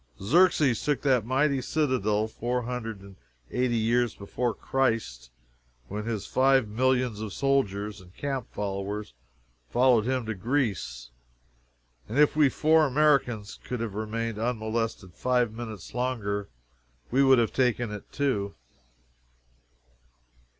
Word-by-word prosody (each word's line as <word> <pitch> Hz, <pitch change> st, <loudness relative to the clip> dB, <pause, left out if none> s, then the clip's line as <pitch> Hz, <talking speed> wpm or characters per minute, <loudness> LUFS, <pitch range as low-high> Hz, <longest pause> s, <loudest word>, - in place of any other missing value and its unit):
Xerxes 145 Hz, -, +3 dB
took 145 Hz, -2 st, 0 dB
that 125 Hz, -6 st, +2 dB
mighty 135 Hz, +1 st, +2 dB
citadel 120 Hz, -8 st, 0 dB
four 120 Hz, +2 st, -2 dB
hundred 115 Hz, -4 st, -5 dB
and 100 Hz, -1 st, -14 dB, 0.3 s
eighty 125 Hz, -2 st, +1 dB
years 120 Hz, +1 st, +1 dB
before 120 Hz, +4 st, -2 dB
Christ, 115 Hz, -, -1 dB, 0.6 s
when 105 Hz, +2 st, -4 dB
his 110 Hz, -4 st, -3 dB
five 130 Hz, -2 st, +3 dB
millions 125 Hz, 0 st, +1 dB
of 105 Hz, -3 st, -5 dB
soldiers 105 Hz, -7 st, 0 dB
and 90 Hz, -1 st, -16 dB
camp 135 Hz, -4 st, -3 dB
followers 100 Hz, -, -4 dB, 0.6 s
followed 120 Hz, -, +4 dB
him 130 Hz, -2 st, 0 dB
to 110 Hz, -, -2 dB
Greece, 100 Hz, -, -2 dB, 1.0 s
and 120 Hz, -, -3 dB
if 150 Hz, 0 st, +5 dB
we 150 Hz, -3 st, +5 dB
four 155 Hz, +2 st, +3 dB
Americans 130 Hz, -7 st, +1 dB
could 125 Hz, -, -4 dB
have 115 Hz, -3 st, -3 dB
remained 110 Hz, +1 st, -3 dB
unmolested 110 Hz, -4 st, -2 dB
five 125 Hz, +2 st, +1 dB
minutes 110 Hz, -5 st, -8 dB
longer, 110 Hz, -5 st, -2 dB, 0.6 s
we 135 Hz, +3 st, +4 dB
would 135 Hz, -1 st, +6 dB
have 115 Hz, -2 st, +1 dB
taken 120 Hz, -3 st, +1 dB
it 105 Hz, -1 st, -8 dB
too. 115 Hz, -8 st, -1 dB
115 Hz, 125 wpm, -27 LUFS, 105-130 Hz, 1.0 s, would